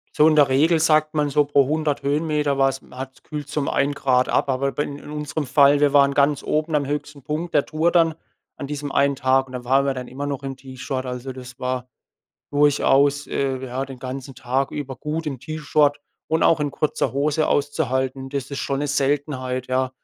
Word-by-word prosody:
So 150 - +6
in 155 - +4
der 145 -2 +6
Regel 160 +5 +3
sagt 155 -1 +3
man 150 -1 +1
so 145 +1 +3
pro 140 -1 +3
100 155 -1 -1
Höhenmeter 150 -1 0
war 135 - +5
es 135 0 -6
hat's 130 +1 -9
kühlt's 150 0 -7
um 145 - 0
1 140 +1 +1
Grad 130 -2 +1
ab. - - +1
Aber 135 +1 0
bei 145 - -1
in 145 +1 -8
unserem 150 -1 -4
Fall 140 +2 +5
wir 145 -1 +3
waren 140 -1 +5
ganz 140 0 +2
oben, 155 +1 0
am 145 -1 +1
höchsten 145 0 -5
Punkt 160 +5 -4
der 140 - +4
Tour 160 +2 +1
dann, 165 -2 +3 0.4
an 140 - -6
diesem 145 0 -4
einen 140 0 +2
Tag, 130 +1 +2
und 130 - -13
dann 125 -1 -6
waren 135 +2 +3
wir 135 -1 0
dann 125 -1 -6
immer 140 +3 -5
noch 140 -1 -4
im 135 -1 -4
T-Shirt. 130 0 -5
Also, 125 +1 -5
das 125 -1 -11
war 125 0 -3 0.7
durchaus, 145 0 +3
äh, 135 -1 -1
ja, 130 +2 -3
den 135 -1 -10
ganzen 130 +1 -7
Tag 130 +2 -1
über 140 -2 -5
gut 155 +5 -4
im 135 -5 -4
T-Shirt 150 -1 +1 0.3
und 160 +1 +2
auch 160 - +4
in 145 -1 0
kurzer 150 -1 -1
Hose 150 +2 +1
auszuhalten. 135 -2 -1
Das 140 -1 -4
ist 140 - -3
schon 135 - -2
'ne 145 - -1
Seltenheit, 135 -3 -1
ja. 130 0 0
140 Hz, 215 wpm, -22 LUFS, 130-150 Hz, 0.7 s, So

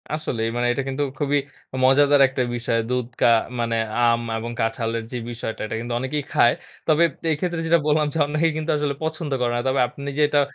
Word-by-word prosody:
আসলেই 120 -7 -2
মানে 120 0 +1
এটা 135 - -2
কিন্তু 135 +2 -1 0.2
খুবই 145 0 +2 0.4
অ - - -4
মজাদার 140 +2 +5
একটা 130 0 -3
বিষয়। 120 -1 -1
দুধ 125 -1 -1
কা - - +6 0.3
মানে 115 -1 0 0.3
আম 115 -1 +4 0.2
এবং 115 +1 -5
কাঁঠালের 115 0 -1
যে 125 - -3
বিষয়টা, 115 -1 -5
এটা 110 - -4
কিন্তু 120 +1 -4
অনেকেই 140 +3 -2
খায়। 120 - +5 0.3
তবে 155 +1 +4 0.3
এই - - +2
ক্ষেত্রে 175 -1 -2
যেটা 170 +1 +4
বললাম 150 0 +3
যে - - -3
অনেকেই 155 +2 +1
কিন্তু 155 +1 -1
আসলে 145 -1 -1
পছন্দ 160 -1 -3
করে 120 -1 +1
না। - - 0
তবে 130 +1 +1
আপনি 140 +2 -9
যে - - +2
এটা 145 - +3
135 Hz, 210 wpm, -23 LUFS, 120-150 Hz, 0.4 s, কা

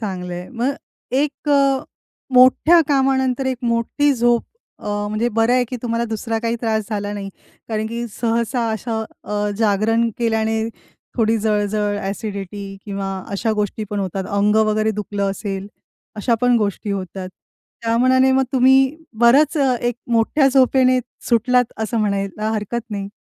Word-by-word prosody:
चांगल 185 -4 -4
आहे. 175 +1 -6
मग 255 +3 -1 0.5
एक 295 0 -3
अ, 275 -2 +4 0.6
मोठ्या 260 +7 +6
कामानंतर 265 -2 +1
एक 260 -1 0
मोठी 235 +5 +1
झोप, 240 0 +2 0.4
अ, - - -7 0.2
म्हणजे 215 +3 0
बरं 225 +2 +3
आहे 250 -1 +3
की 255 - -4
तुम्हाला 235 -1 -1
दुसरा 225 0 -3
काही 230 +1 -1
त्रास 220 -2 0
झाला 205 -1 -2
नाही. 200 -1 -5 0.4
कारण 220 -1 -2
की 235 +1 -4
सहसा 235 0 0
अशा 220 +1 -3 0.2
अ, 210 0 -1
जागरण 225 +2 +2
केल्याने 220 -1 0 0.6
थोडी 225 -1 +2
जळजळ, 210 -1 0
ॲसिडिटी 200 -1 -5
किंवा 195 -1 -4 0.2
अशा 220 +3 -1
गोष्टी 210 +1 -2
पण 205 - -2
होतात. 190 0 -3
अंग 205 +1 +2
वगैरे 215 0 +2
दुखलं 200 -1 -2
असेल, 195 -1 -4 0.5
अशा 230 +3 +1
पण 245 -1 +4
गोष्टी 205 0 -2
होतात. 190 -1 -4 0.5
त्या 230 0 +1
मानाने 260 +1 +4
मग 265 0 +3
तुम्ही 265 +2 +4 0.2
बरंच 275 +7 +5
एक 250 -3 +1 0.2
मोठ्या 250 +5 +3
झोपेने, 255 -1 +4 0.3
सुटलात 245 +1 +2
असं 220 +1 -1
म्हणायला 200 +1 -1
हरकत 220 +2 -2
नाही. 200 -1 -4
225 Hz, 145 wpm, -20 LUFS, 205-250 Hz, 0.6 s, मोठ्या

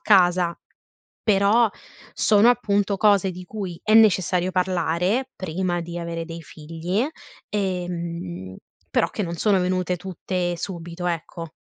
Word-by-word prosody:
casa, 180 - +4 0.7
però, 210 +2 +4 0.4
sono, 215 +2 +5
appunto, 205 -4 +1
cose 200 -3 +4
di 180 +1 -8
cui 190 -4 -6
è 215 - +2
necessario 185 -4 +4
parlare 185 +6 0
prima 175 0 -2
di 170 +1 -6
avere 170 -1 -4
dei 165 0 -7
figli 165 - -3 0.4
e 190 -4 -1
mhmm, 95 - -5 0.3
però, - - +2
che 210 - -3
non 170 -1 -4
sono 195 +2 +2
venute 180 0 0
tutte, 180 -1 -3
subito, 175 -1 -6
ecco. 165 0 -4
180 Hz, 130 wpm, -23 LUFS, 170-200 Hz, 0.7 s, sono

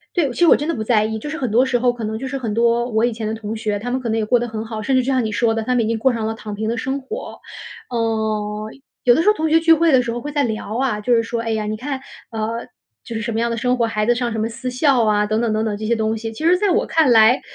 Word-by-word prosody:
对， 310 -7 +2
其 - - -10
实 345 - +5
我 - - +7
真 295 +3 -4
的 330 - 0
不 220 - -3
在 215 -1 +2
意。 220 0 -2
就 295 - -7
是 315 - -4
很 255 -7 -2
多 240 +4 +4
时 255 -2 +1
候， 245 0 +2
可 240 - -8
能 220 +1 -3
就 270 - -5
是 270 +1 -3
很 230 -5 -3
多 235 +2 +2
我 220 +1 +1
以 240 - +1
前 220 -1 -5
的 220 - -2
同 220 0 -5
学， 210 -2 -2
他 245 +4 -5
们 260 +1 -1
可 245 - -4
能 225 0 0
也 215 - 0
过 245 +3 +3
得 240 0 -3
很 220 0 -5
好， 220 -1 -6
甚 265 +4 +1
至 255 - +3
就 250 - -6
像 255 -3 +1
你 215 - -2
说 225 +1 +1
的， 225 - -1
他 250 +3 -1
们 235 -2 +2
已 - - -1
经 230 0 -1
过 260 +2 +2
上 225 -2 -2
了 225 - -2
躺 215 -2 -7
平 220 +1 -3
的 235 - -1
生 265 +4 -2
活。 355 - -7 0.5
呃， 220 -2 -2 0.4
有 240 - +6
的 320 - +2
时 415 - +2
候 425 - +6
同 315 0 -1
学 325 +1 +5
聚 330 0 +5
会 325 -1 +3
的 255 - +5
时 235 - -3
候 240 - -4
会 295 +4 -6
在 290 -1 +1
聊 220 0 -3
啊， 255 -6 0
就 240 +3 +2
是 230 - +3
说- 230 0 -3
哎 230 - -3
呀， 220 -1 -1
你 215 - -2
看， 265 +3 -4 0.3
呃， 225 +1 -3 0.4
就 235 - -7
是 220 - -2
什 230 +1 -3
么 225 - -1
样 235 0 0
的 230 - -2
生 250 +2 +1
活， 235 -2 +1
孩 215 -1 -1
子 240 - +4
上 240 -1 -2
什 220 - -3
么 220 +1 0
私 255 +2 -5
校 255 -2 +2
啊 210 -1 +2
等 215 +1 0
等 235 -2 0
等 215 +1 0
等 215 -2 -2
这 215 +1 -5
些 235 - +2
东 220 0 -1
西。 225 0 -5
其 265 +8 -7
实 350 +2 +5
在 405 +1 +1
我 435 +7 +1
看 315 -6 +3
来， 225 +3 +6
230 Hz, 375 characters per minute, -20 LUFS, 220-255 Hz, 0.5 s, 我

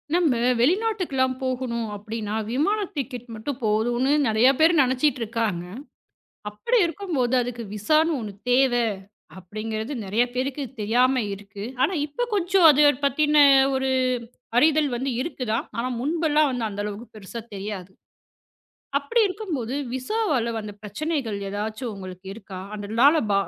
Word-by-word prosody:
நம்ம 325 -8 +3 0.2
வெளிநாட்டுக்கெல்லாம் 340 - +1
போகணும் 250 -3 -2
அப்படின்னா 215 0 -5 0.2
விமான 320 - +1 0.2
டிக்கெட் 255 -3 -5
மட்டும் 255 +5 -5
போதும்னு 240 +5 +1 0.2
நெறைய 220 +3 +4
பேர் 320 +2 +6
நினைச்சுட்டு 260 +1 +1
இருக்காங்க. 220 -6 -2 0.9
அப்படி 210 - -1
இருக்கும்போது 315 -8 -1
அதுக்கு 240 -1 -4
விசான்னு 310 +10 +2
ஒண்ணு 210 -3 -6 0.2
தேவை 245 -1 +4 0.6
அப்படிங்கிறது 215 +6 -5
நெறைய 205 +5 +1
பேருக்குத் 265 +1 -3
தெரியாம 250 +5 +3
இருக்கு. 200 0 -9 0.2
ஆனா 280 - +3
இப்ப 395 +12 -3
கொஞ்சம் 370 -2 +4
அதைப் 290 -2 +4
பத்தின 295 +2 +2 0.4
ஒரு 265 0 0 0.7
அறிதல் 300 +1 +4
வந்து 265 +3 -2
இருக்குதான். 250 -8 -3
ஆனா 240 +2 -1
முன்பெல்லாம் 305 +1 +2 0.2
அந்த 205 0 -4
அளவுக்குப் 210 +3 -7
பெருசா 215 +3 -7
தெரியாது. 195 -2 -6 1.1
அப்படி 290 +12 0
இருக்கும்போது 330 - -4 0.2
விசாவால 275 - 0
வந்து 210 -1 -7
பிரச்சனைகள் 230 +1 -3
எதாச்சும் 215 +4 -4
உங்களுக்கு 185 -1 -9
இருக்கா? 195 -3 -9 0.2
அதனால 230 +10 +3
ப - - +2
250 Hz, 125 wpm, -24 LUFS, 215-295 Hz, 1.1 s, பேர்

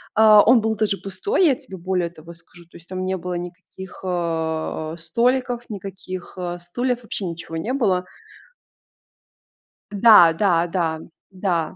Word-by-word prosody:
а, 215 -1 +8
он 245 +2 +6
был 220 0 0
даже 210 -2 0
пустой, 365 - 0
я 285 -5 +4
тебе 255 -8 -11
более 180 -1 -1
того 165 0 -13
скажу. 170 0 -17
То 170 - -16
есть 170 - -17
там 185 0 -4
не 190 0 -1
было 180 0 -5
никаких, 180 +2 -9
э, 160 -3 -2
э, - - -14
столиков, 240 +7 -1
никаких, 190 -3 -7
э, 175 -1 -4
стульев, 245 +8 -2
вообще 215 -3 -5
ничего 165 -1 -6
не 220 +10 -3
было. 200 -9 +1 1.9
Да, 205 -5 +7
да, 175 -1 +2
да. 165 -3 -2 0.3
Да. 180 -4 -2
185 Hz, 155 wpm, -22 LUFS, 170-215 Hz, 1.9 s, а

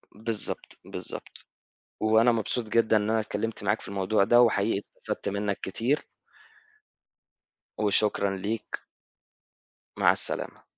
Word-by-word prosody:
بالضبط، 110 0 -1
بالضبط، - - -7 0.6
وأنا 110 +2 +4
مبسوط 115 +2 0
جدًا 110 0 +3
إن 105 +1 0
أنا 110 0 +2
اتكلمت 110 +1 -4
معاك 105 +2 +1
في - - -10
الموضوع 100 +1 +1
ده، 120 +3 +5
وحقيقي 105 -3 +2
استفدت 100 - -6
منك 100 0 -2
كتير. 120 +9 -1 1.7
وشكرًا 100 -1 +2
ليك. 105 +4 -5 1.1
مع - - +5
السلامة. - - -1
110 Hz, 110 wpm, -27 LUFS, 100-115 Hz, 1.7 s, ده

